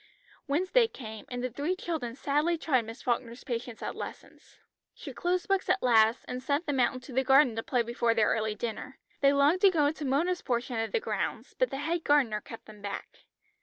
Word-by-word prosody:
Wednesday 370 Hz, -, +3 dB
came, 220 Hz, -, -9 dB
and 245 Hz, 0 st, -4 dB
the 255 Hz, -, -1 dB
three 295 Hz, +9 st, -1 dB
children 315 Hz, -, -4 dB
sadly 295 Hz, +5 st, +1 dB
tried 260 Hz, -7 st, +1 dB
Miss 225 Hz, +3 st, -9 dB
Falkner's 240 Hz, -1 st, -2 dB
patience 240 Hz, -2 st, -5 dB
at -, -, -3 dB
lessons. -, -, -10 dB, 0.4 s
She -, -, -8 dB
closed 360 Hz, +3 st, -1 dB
books 390 Hz, -1 st, 0 dB
at -, -, +2 dB
last, 225 Hz, -1 st, +4 dB
and 250 Hz, 0 st, -4 dB
sent 285 Hz, +5 st, 0 dB
them 285 Hz, -3 st, -1 dB
out 250 Hz, +1 st, +3 dB
into 255 Hz, +1 st, -9 dB
the 265 Hz, +2 st, +2 dB
garden 265 Hz, -2 st, +5 dB
to 225 Hz, -, -2 dB
play 245 Hz, +1 st, 0 dB
before 235 Hz, 0 st, 0 dB
their 220 Hz, -2 st, +3 dB
early 220 Hz, -1 st, 0 dB
dinner. 235 Hz, +4 st, -5 dB, 0.2 s
They 275 Hz, 0 st, +5 dB
longed 285 Hz, +6 st, +3 dB
to 395 Hz, -, +8 dB
go 320 Hz, -5 st, +2 dB
into 300 Hz, +1 st, -1 dB
Mona's 330 Hz, +7 st, +1 dB
portion 240 Hz, -1 st, -2 dB
of 225 Hz, -, -2 dB
the -, -, +1 dB
grounds, 475 Hz, -, -3 dB
but -, -, +1 dB
the -, -, -4 dB
head 325 Hz, +4 st, -2 dB
gardener 255 Hz, -8 st, +2 dB
kept 225 Hz, -, -11 dB
them 210 Hz, -1 st, -13 dB
back. 200 Hz, -1 st, -7 dB
265 Hz, 210 wpm, -29 LUFS, 235-315 Hz, 0.4 s, to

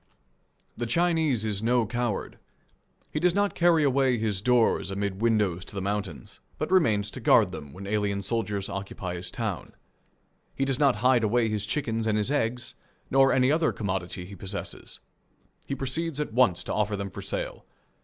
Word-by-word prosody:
The 120 Hz, -, -3 dB
Chinese 160 Hz, -5 st, +1 dB
is 105 Hz, -2 st, -2 dB
no 120 Hz, +1 st, +2 dB
coward. 120 Hz, -2 st, -3 dB, 0.7 s
He 150 Hz, -, 0 dB
does 175 Hz, +2 st, +2 dB
not 205 Hz, 0 st, +2 dB
carry 170 Hz, -2 st, +4 dB
away 135 Hz, -2 st, +3 dB
his 105 Hz, -3 st, -1 dB
doors 120 Hz, -4 st, +3 dB
amid 100 Hz, 0 st, -3 dB
windows 105 Hz, -6 st, +1 dB
to -, -, -10 dB
the -, -, -2 dB
mountains, 100 Hz, -5 st, -4 dB, 0.2 s
but -, -, -3 dB
remains 105 Hz, -, +3 dB
to -, -, -7 dB
guard -, -, +4 dB
them 75 Hz, -3 st, -8 dB
when 95 Hz, +7 st, -9 dB
alien 100 Hz, -1 st, -1 dB
soldiers 100 Hz, -1 st, -1 dB
occupy 95 Hz, -2 st, -5 dB
his 90 Hz, 0 st, -5 dB
town. 110 Hz, -7 st, -4 dB, 0.8 s
He 135 Hz, -, 0 dB
does 135 Hz, -2 st, 0 dB
not 140 Hz, -4 st, +4 dB
hide 125 Hz, -2 st, +5 dB
away 115 Hz, +1 st, +2 dB
his 105 Hz, -2 st, -2 dB
chickens 115 Hz, -3 st, -1 dB
and 110 Hz, -1 st, +2 dB
his 105 Hz, +5 st, 0 dB
eggs, 125 Hz, -3 st, -1 dB, 0.4 s
nor 135 Hz, 0 st, +5 dB
any 130 Hz, +1 st, +3 dB
other 160 Hz, +1 st, +2 dB
commodity 95 Hz, -3 st, -3 dB
he 100 Hz, -, -11 dB
possesses. 100 Hz, +2 st, -6 dB, 0.7 s
He 140 Hz, -, -2 dB
proceeds 140 Hz, +4 st, -3 dB
at 150 Hz, -7 st, -3 dB
once 115 Hz, -8 st, +3 dB
to -, -, -4 dB
offer 105 Hz, -1 st, 0 dB
them 100 Hz, -1 st, -4 dB
for -, -, -7 dB
sale. -, -, -4 dB
110 Hz, 175 wpm, -27 LUFS, 100-135 Hz, 0.8 s, hide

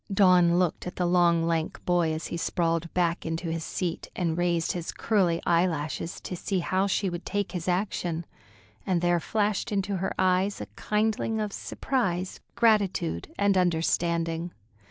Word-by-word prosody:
Dawn 180 Hz, -3 st, +5 dB
looked 180 Hz, -1 st, 0 dB
at 180 Hz, -, -6 dB
the 180 Hz, -, 0 dB
long, 175 Hz, -1 st, +3 dB
lank 165 Hz, -1 st, -1 dB
boy 175 Hz, -2 st, +2 dB
as 155 Hz, 0 st, -3 dB
he -, -, -4 dB
sprawled 165 Hz, -1 st, -1 dB
back 175 Hz, -2 st, +1 dB
into 165 Hz, +1 st, -3 dB
his 165 Hz, 0 st, -3 dB
seat 175 Hz, -1 st, -3 dB
and 165 Hz, -3 st, 0 dB
raised 170 Hz, -1 st, +1 dB
his 175 Hz, -2 st, -4 dB
curly 185 Hz, -6 st, +1 dB
eyelashes, 170 Hz, -2 st, 0 dB
to 180 Hz, -, -5 dB
see 190 Hz, +2 st, -2 dB
how 185 Hz, +2 st, +1 dB
she 200 Hz, 0 st, 0 dB
would 175 Hz, -1 st, -4 dB
take 205 Hz, 0 st, -2 dB
his 180 Hz, -2 st, -5 dB
action, 175 Hz, -3 st, -1 dB, 0.6 s
and 180 Hz, -3 st, 0 dB
there 175 Hz, 0 st, +3 dB
flashed 210 Hz, +4 st, -1 dB
into 200 Hz, -1 st, 0 dB
her 190 Hz, -, -2 dB
eyes 185 Hz, +2 st, +2 dB
a -, -, -4 dB
kindling 220 Hz, +1 st, 0 dB
of 210 Hz, -2 st, -2 dB
surprise, 190 Hz, -9 st, -2 dB, 0.2 s
gratitude, 200 Hz, -, +1 dB
and 200 Hz, -1 st, +3 dB
understanding. 170 Hz, -1 st, +1 dB
175 Hz, 160 wpm, -27 LUFS, 170-195 Hz, 0.6 s, Dawn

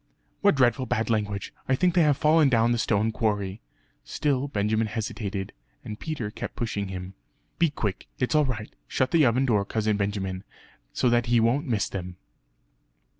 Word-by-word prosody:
"What 200 Hz, -5 st, +4 dB
dreadful 130 Hz, 0 st, +2 dB
bad 110 Hz, +1 st, 0 dB
language! 105 Hz, -2 st, -2 dB, 0.2 s
I 130 Hz, -, +4 dB
think 180 Hz, +5 st, +2 dB
they 175 Hz, -, +4 dB
have 150 Hz, -3 st, +3 dB
fallen 155 Hz, 0 st, +4 dB
down 115 Hz, -1 st, +3 dB
the 120 Hz, -, +1 dB
stone 110 Hz, 0 st, +1 dB
quarry." 105 Hz, -2 st, -1 dB, 0.4 s
Still 140 Hz, -2 st, -1 dB
Benjamin 110 Hz, -2 st, 0 dB
hesitated, 105 Hz, -3 st, -4 dB, 0.3 s
and 105 Hz, 0 st, -6 dB
Peter 145 Hz, -10 st, -4 dB
kept -, -, -6 dB
pushing 105 Hz, -4 st, -2 dB
him 95 Hz, 0 st, -6 dB, 0.5 s
"Be 170 Hz, -1 st, +4 dB
quick, 105 Hz, -9 st, -4 dB
it's 125 Hz, -, 0 dB
all 150 Hz, -1 st, +4 dB
right. 110 Hz, -5 st, -4 dB
Shut 130 Hz, -, 0 dB
the 160 Hz, -6 st, +5 dB
oven 125 Hz, +3 st, +2 dB
door, 105 Hz, -6 st, +2 dB
Cousin 110 Hz, 0 st, 0 dB
Benjamin, 100 Hz, -2 st, -2 dB, 0.5 s
so -, -, 0 dB
that 120 Hz, 0 st, +2 dB
he 120 Hz, 0 st, +4 dB
won't 125 Hz, +7 st, +2 dB
miss 110 Hz, -6 st, 0 dB
them." 90 Hz, -2 st, -6 dB
115 Hz, 175 wpm, -26 LUFS, 105-130 Hz, 0.5 s, the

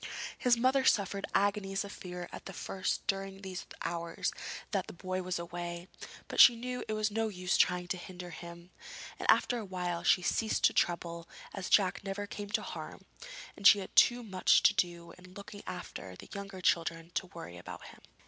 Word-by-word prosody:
His 245 Hz, -1 st, +3 dB
mother 260 Hz, +3 st, +3 dB
suffered 200 Hz, -4 st, +2 dB
agonies 195 Hz, 0 st, +1 dB
of 200 Hz, -, -8 dB
fear 180 Hz, -2 st, -7 dB
at -, -, -8 dB
first 190 Hz, -1 st, -2 dB
during 195 Hz, -1 st, -2 dB
these 185 Hz, -1 st, -6 dB, 0.2 s
hours 170 Hz, -1 st, -2 dB, 0.4 s
that 195 Hz, -4 st, -1 dB
the -, -, -8 dB
boy 185 Hz, +1 st, -3 dB
was 185 Hz, 0 st, -2 dB
away, 175 Hz, +1 st, -5 dB, 0.4 s
but -, -, -4 dB
she 240 Hz, -, +10 dB
knew 250 Hz, +2 st, -4 dB
it 215 Hz, -, -2 dB
was 215 Hz, 0 st, 0 dB
no 225 Hz, +1 st, 0 dB
use 180 Hz, -3 st, -1 dB
trying 180 Hz, 0 st, +3 dB
to 185 Hz, -, -1 dB
hinder 180 Hz, 0 st, -8 dB
him, 170 Hz, +1 st, -10 dB, 0.5 s
and -, -, -4 dB
after 245 Hz, -, +4 dB
a -, -, -5 dB
while 180 Hz, -3 st, -3 dB
she 180 Hz, -, +4 dB
ceased 220 Hz, +4 st, 0 dB
to -, -, +6 dB
trouble, 170 Hz, -1 st, -1 dB, 0.2 s
as 195 Hz, -3 st, -4 dB
Jack 195 Hz, -2 st, +3 dB
never 195 Hz, +1 st, -3 dB
came 205 Hz, 0 st, -7 dB
to 210 Hz, -, 0 dB
harm, -, -, -7 dB, 0.5 s
and 200 Hz, -, +5 dB
she -, -, +9 dB
had 195 Hz, -, -7 dB
too 245 Hz, 0 st, +6 dB
much 190 Hz, -4 st, +3 dB
to -, -, +6 dB
do 170 Hz, -1 st, -1 dB
in 185 Hz, 0 st, -15 dB
looking 205 Hz, 0 st, -9 dB
after 95 Hz, -, -7 dB
the -, -, -13 dB
younger 200 Hz, -2 st, -7 dB
children 165 Hz, -1 st, +1 dB
to 185 Hz, -, -1 dB
worry 85 Hz, -, -9 dB
about -, -, -9 dB
him. -, -, -15 dB
185 Hz, 190 wpm, -32 LUFS, 175-205 Hz, 0.5 s, she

